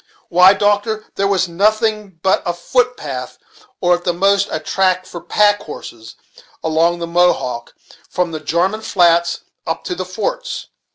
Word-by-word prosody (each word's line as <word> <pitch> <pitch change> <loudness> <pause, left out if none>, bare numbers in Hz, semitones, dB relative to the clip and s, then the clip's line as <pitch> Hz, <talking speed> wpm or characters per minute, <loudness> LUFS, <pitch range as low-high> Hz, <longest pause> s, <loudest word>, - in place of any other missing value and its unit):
Why, 180 +3 +6
doctor, 205 +2 0
there 195 - 0
was 190 -2 +1
nothing 210 +1 0
but 190 - +3
a 175 - -2
foot 250 +7 0
path, 130 -4 -6 0.4
or 175 - +4
at 175 0 -1
the 175 - 0
most 200 +3 +2
a - - -2
track 185 +3 0
for 170 - -9
pack 205 +2 +2
horses, 115 -6 -10 0.5
along 165 +2 +2
the 170 - -4
Mohawk, 170 -9 0 0.3
from 180 -2 -1
the 155 - -4
Jarman 175 +8 0
Flats 170 -5 +2 0.3
up 165 - -2
to - - -3
the 185 +1 -4
forts. - - -4
180 Hz, 160 wpm, -18 LUFS, 170-205 Hz, 0.5 s, Why